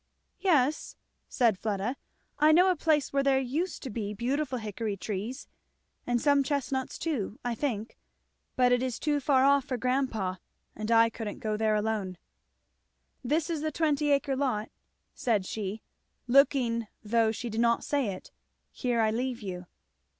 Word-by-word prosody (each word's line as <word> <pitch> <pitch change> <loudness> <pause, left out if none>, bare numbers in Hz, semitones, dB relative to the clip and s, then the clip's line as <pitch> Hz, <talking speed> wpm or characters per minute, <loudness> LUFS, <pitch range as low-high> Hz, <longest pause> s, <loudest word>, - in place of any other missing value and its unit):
"Yes," 305 -6 +1 0.3
said 230 -7 +2
Fleda, 215 +3 -2 0.4
"I 305 +1 +6
know 360 +4 +6
a - - +1
place 300 -3 +1
where 275 - +3
there 275 -1 +3
used 300 +8 -2
to 260 - -5
be 210 -1 -4
beautiful 260 +4 -1
hickory 215 -1 -4
trees, 210 +7 -5 0.6
and 245 0 +2
some 285 +1 +4
chestnuts 270 -1 -2
too, 250 - -3
I 240 - 0
think; 230 -3 -3 0.6
but 250 -1 +4
it 245 0 +3
is 255 -2 -2
too 295 -1 0
far 270 -2 +3
off 280 -1 +4
for 255 - -2
grandpa, 245 -7 -1 0.4
and 215 +1 -5
I 230 0 +5
couldn't 220 -3 -5
go 215 -1 -2
there 215 0 +1
alone. 210 -4 -1 1.1
This 300 +5 0
is 325 -3 -2
the 310 0 -1
twenty 300 -1 +1
acre 280 -1 +2
lot," 255 -6 -1 0.4
said 215 -6 0
she, 210 +1 -4 0.4
looking 245 -3 +3 0.2
though 220 +1 +2
she 235 +1 -5
did 220 +2 0
not 235 0 +2
say 285 -5 0
it, 190 -2 -6 0.4
"Here 240 -2 0
I 220 -1 +2
leave 245 0 -2
you." 180 -2 -6
245 Hz, 160 wpm, -29 LUFS, 220-280 Hz, 1.1 s, I